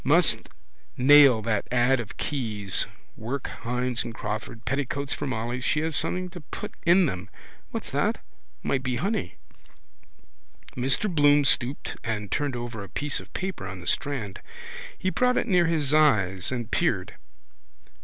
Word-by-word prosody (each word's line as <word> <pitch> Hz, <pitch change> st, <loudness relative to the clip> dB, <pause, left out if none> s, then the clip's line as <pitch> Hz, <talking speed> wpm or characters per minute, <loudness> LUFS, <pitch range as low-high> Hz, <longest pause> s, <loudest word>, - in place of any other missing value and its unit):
Must -, -, +5 dB, 0.6 s
nail 135 Hz, -4 st, +7 dB
that 110 Hz, -2 st, -1 dB
ad 125 Hz, +1 st, +3 dB
of 115 Hz, -3 st, -7 dB
Keyes's. 105 Hz, -9 st, -1 dB, 0.3 s
Work 125 Hz, +4 st, -4 dB
Hynes 125 Hz, +1 st, +1 dB
and 115 Hz, -, -7 dB
Crawford. 110 Hz, +1 st, -5 dB
Petticoats 140 Hz, +2 st, -2 dB
for -, -, -4 dB
Molly. 120 Hz, 0 st, -3 dB
She 150 Hz, +4 st, +1 dB
has 160 Hz, -1 st, 0 dB
something 180 Hz, +5 st, 0 dB
to 175 Hz, -, -9 dB
put 150 Hz, -, -7 dB
in 180 Hz, +2 st, +6 dB
them. 95 Hz, -, -4 dB, 0.4 s
What's -, -, -5 dB
that? -, -, +1 dB, 0.5 s
Might 135 Hz, -, 0 dB
be 130 Hz, -2 st, -2 dB
money. 180 Hz, -, -2 dB, 1.4 s
Mr 135 Hz, +11 st, +1 dB
Bloom 145 Hz, -2 st, +5 dB
stooped 135 Hz, 0 st, 0 dB
and 105 Hz, -4 st, -3 dB
turned 145 Hz, -3 st, -1 dB
over 120 Hz, -3 st, -5 dB
a 100 Hz, -, -10 dB
piece 145 Hz, +9 st, -2 dB
of -, -, -13 dB
paper 185 Hz, -, -4 dB
on 95 Hz, -1 st, -7 dB
the 85 Hz, -, -11 dB
strand. 115 Hz, -4 st, -1 dB, 0.6 s
He 185 Hz, -, -1 dB
brought 250 Hz, +3 st, +2 dB
it -, -, +1 dB
near 180 Hz, -5 st, +4 dB
his 150 Hz, -4 st, +1 dB
eyes 100 Hz, -, +3 dB
and 120 Hz, -3 st, -4 dB
peered. -, -, 0 dB
130 Hz, 155 wpm, -26 LUFS, 110-145 Hz, 1.4 s, nail